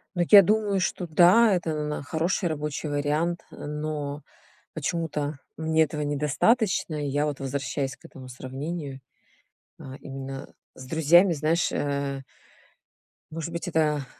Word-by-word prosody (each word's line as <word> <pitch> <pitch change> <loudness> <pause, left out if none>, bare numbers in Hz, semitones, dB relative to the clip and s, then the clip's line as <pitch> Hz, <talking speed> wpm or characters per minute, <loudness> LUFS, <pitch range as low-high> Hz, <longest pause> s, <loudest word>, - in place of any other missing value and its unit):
Ну, 175 - +2
я 205 -2 +11
думаю, 205 0 +1
что 180 0 -2
да, 185 +7 +6
это 170 -3 -2
на 150 -1 -3
хороший 170 +5 -1
рабочий 150 0 -3
вариант, 150 +4 -1
но 150 -1 -5 0.5
почему-то 150 -2 -3 0.2
мне 160 0 +2
этого 150 0 -3
недостаточно. 150 - +1
Я 145 +2 0
вот 145 -2 -3
возвращаюсь 135 0 -3
к - - -22
этому 130 -1 -11
сравнению, 135 +3 -6 0.8
а, 130 0 -9
именно 135 0 -7 0.2
с 130 - -10
друзьями. 165 +4 +5
Знаешь, 160 +3 +1
э 140 -1 -2 1.1
может 165 +1 -5
быть, 170 +2 -4
это 150 -4 +1
150 Hz, 125 wpm, -26 LUFS, 140-170 Hz, 1.1 s, я